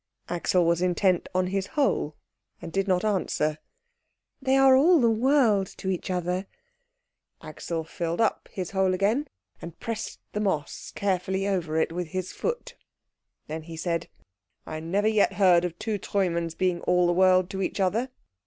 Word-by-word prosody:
Axel 175 0 +1
was 170 +1 +2
intent 180 0 +1
on 185 0 +2
his 195 +1 -2
hole 205 - +1 0.4
and 165 - -9
did 195 0 0
not 185 +1 +1
answer. 155 -7 0 0.8
"They 265 0 +2
are 270 -1 +7
all 325 +6 +5
the 235 -3 +4
world 225 -4 +3
to 190 - -2
each 185 - -4
other." 180 +1 -2 1.0
Axel 160 +1 -4
filled 170 0 -4
up 225 - 0
his 185 -3 -5
hole 190 -1 +2
again, 220 +10 +1 0.3
and 170 -1 -9
pressed 225 -1 -4
the 210 - -3
moss 190 -8 -2
carefully 190 0 -1
over 165 -5 0
it 160 - +1
with 175 0 -3
his 185 +3 -4
foot. 485 +1 -4 0.7
Then 160 +1 -5
he 165 +1 -9
said, 170 0 -2 0.6
"I 155 - -5
never 190 +6 0
yet 215 -2 +3
heard 180 -4 +5
of 175 -1 -3
two 215 0 -2
Treumanns 170 -4 -1
being 180 -2 0
all 180 0 +3
the 175 - +2
world 185 0 +4
to 195 - -3
each 190 - -2
other." 210 +7 +1
185 Hz, 165 wpm, -26 LUFS, 170-205 Hz, 1.0 s, are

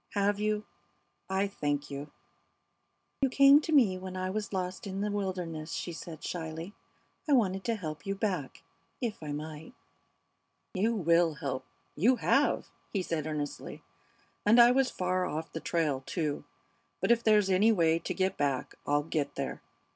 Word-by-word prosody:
"Have 205 0 +2
you? 215 0 0 0.6
I 190 +1 +1
thank 145 -6 -2
you." 140 +1 -6 1.1
"You 270 - +3
came 275 +3 +7
to 320 - -4
me 225 -11 +4
when 185 0 -6
I 185 0 -2
was 210 0 -3
lost 185 0 -3
in 195 0 -3
the 210 0 -1
wilderness," 180 -6 -3
she 175 - -4
said, 160 -1 -9
shyly. 165 +2 -5 0.6
"I - - +5
wanted 195 -7 +2
to 230 - +1
help 155 -5 -6
you 195 - -1
back 200 -2 -3 0.4
if 230 -8 -3
I 150 -2 -5
might." 155 - -7 1.0
"You 220 +5 +1
will 170 -4 +3
help 135 -2 -4 0.3
you 230 +11 +4
have!" - - +2 0.2
he 195 -3 -1
said, 155 -3 -2
earnestly. 150 -2 -5 0.6
"And 220 +4 +6
I 240 0 +9
was 260 0 +3
far 185 0 -1
enough 155 -4 -2
off - - -31
the 160 - -3
trail, 155 -6 0
too, 150 0 -2 0.5
but - - +2
if 235 0 +3
there's 210 -3 +4
any 205 +5 +5
way 165 -5 +3
to - - -4
get 190 0 0
back 140 -2 -1
I'll 145 0 +2
get 150 -2 -2
there." - - -4
185 Hz, 170 wpm, -30 LUFS, 155-210 Hz, 1.1 s, I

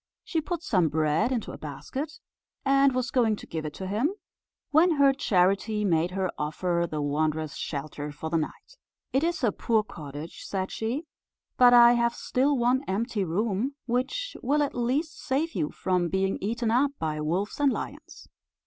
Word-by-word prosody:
She 325 - -1
put 345 +1 -4
some 180 -7 +2
bread 155 - +1
into 240 -5 -2
a - - -9
basket, 260 - -5 0.5
and 275 -1 +4
was 255 -1 -1
going 230 -4 +3
to - - -11
give 160 -1 -4
it 150 - -7
to 190 - -6
him, 215 +10 +1 0.6
when 325 +4 +5
her 280 -1 +5
charity 210 -2 +1
made 170 -2 +2
her 185 0 -2
offer 170 +3 0
the 150 -1 -2
wanderers 155 +1 -1
shelter 145 +1 -5
for 160 +2 -6
the 165 - +2
night. 330 - -7 0.4
"It 270 +3 +2
is 340 -3 -1
a 230 - +4
poor 220 0 +1
cottage," 150 -4 -8
said 190 -1 -3
she; 235 +8 -2 0.5
"but 245 -1 +7
I 240 0 +8
have 235 0 +1
still 275 +2 +1
one 250 +3 +2
empty 210 +1 -1
room, 210 - -1
which 260 - -2
will 290 +4 +2
at 285 - -2
least 265 +7 -1
save 300 +5 -1
you 150 - -1
from 180 -2 0
being 190 +2 0
eaten 230 +3 -1
up 275 +4 +3
by 155 -1 -2
wolves 180 - -2
and 285 -2 +4
lions." - - -7
220 Hz, 175 wpm, -27 LUFS, 170-265 Hz, 0.6 s, I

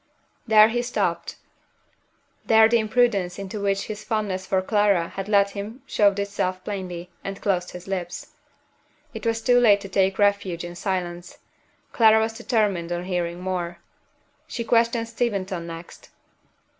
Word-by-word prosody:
There 215 0 +7
he 240 +1 0
stopped. 245 0 -2 1.1
There 220 0 +6
the 235 +1 +3
imprudence 215 -5 +1
into 200 +1 -6
which 195 0 0
his 210 -1 -7
fondness 205 -4 -2
for 190 - +2
Clara 200 -4 +2
had 195 +1 -6
led 200 -1 +4
him 215 +6 -7
showed 205 -6 +2
itself 200 -2 -2
plainly, 180 -3 -6
and 195 0 -5
closed 180 -3 -1
his 180 +1 -10
lips. 190 - -4 0.8
It - - -5
was 225 0 -1
too 245 0 +5
late 210 -4 +5
to 195 - -8
take 190 0 +1
refuge 200 -4 +1
in 175 0 -6
silence. 175 -1 -4 0.6
Clara 220 -1 +6
was 220 0 0
determined 210 -7 0
on 175 0 -2
hearing 175 -1 -3
more. 180 -2 -3 0.7
She 235 - -4
questioned 230 0 +2
Steventon 195 -7 -2
next. 165 0 -10
200 Hz, 145 wpm, -24 LUFS, 180-220 Hz, 1.1 s, There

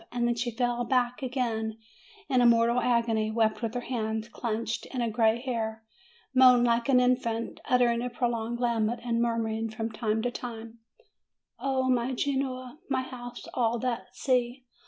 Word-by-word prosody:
And 240 -1 0
then 240 - +2
she 240 +1 -2
fell 245 0 -1
back 245 +1 +1
again 230 -4 -2 0.5
into 255 -3 +3
a - - +7
mortal 235 +1 +4
agony, 230 -3 +1
wept 220 0 +1
with 230 0 -3
her 245 - -1
hands 220 -2 -3
clutched 225 -2 -3
in 255 - -5
her 235 -2 0
gray 225 0 +3
hair, 225 -3 -3 0.5
moaned 255 -2 +7
like 235 +2 +2
an 255 -2 +6
infant, 245 -2 0
uttering 240 -2 +3
a 250 - -2
pro 245 0 0
longed 235 0 -3
lament, 235 -1 0
and 235 -1 0
murmuring 225 -1 -1
from 225 +1 -4
time 220 0 -1
to 245 - 0
time: 230 -1 -7 0.8
"O 265 -1 0
my 250 0 +1
Genoa! 260 0 -2
My 260 -1 +1
house! 245 -1 -8
All 235 -1 +1
that 245 0 -3
sea! 250 -1 0
240 Hz, 170 wpm, -28 LUFS, 225-250 Hz, 0.8 s, a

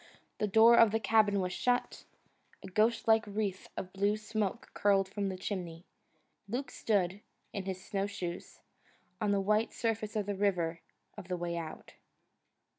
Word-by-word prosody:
The 210 - +1
door 225 +3 +7
of 230 - +7
the 225 +2 0
cabin 215 -3 +3
was 180 0 -2
shut; 245 +4 -1 0.6
a - - -7
ghostlike 220 +2 +3
wreath 200 -2 -3
of 185 -1 -5
blue 200 +2 +1
smoke 215 -2 -3
curled 195 -1 +3
from 200 0 -2
the 185 - -4
chimney. 180 -3 -5 0.6
Luke 250 +4 -3
stood, 200 -2 0 0.3
in 195 -2 -4
his 185 -1 -5
snowshoes, 195 -3 -4 0.6
on 210 - +1
the 200 0 +3
white 210 +3 +1
surface 225 -1 -2
of 210 -2 0
the 205 - -2
River 180 -4 0 0.3
of 210 -4 -9
the 180 -1 -2
Way 170 0 -3
Out. 165 -2 -7
200 Hz, 155 wpm, -32 LUFS, 185-215 Hz, 0.6 s, door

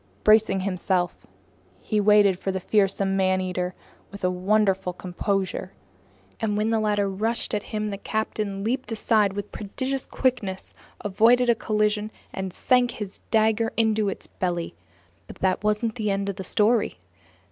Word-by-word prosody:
Bracing 215 -3 +4
himself, 185 -2 -1 0.5
he 215 - -1
waited 205 -3 +5
for 195 - -2
the 190 - -2
fearsome 195 0 +1
man 190 -1 +2
eater 180 -1 -2 0.3
with 200 -1 -11
wonderful 190 0 +1
composure, 185 +1 -3 0.7
and 210 -2 0
when 215 +2 +1
the 225 - +2
latter 205 -2 +1
rushed 220 +6 -1
at 210 - 0
him, 215 -1 -2
the 200 -1 -5
captain 210 -3 -3
leaped 255 +3 -2
aside 215 -2 +2
with 205 0 -5
prodigious 260 +6 -3
quickness, 225 -8 -1 0.3
avoided 235 +5 +4
a - - +5
collision, 210 -1 0 0.2
and 190 -1 -4
sank 245 +5 +2
his 205 -4 -7
dagger 220 0 +2
into 220 -2 +2
its - - -4
belly. 175 -2 -3 0.5
But - - -10
that 190 +1 0
wasn't 210 +2 +1
the 215 -3 -2
end 195 0 -1
of 195 - -4
the 190 - -5
story. 215 - +2
210 Hz, 150 wpm, -25 LUFS, 190-220 Hz, 0.7 s, waited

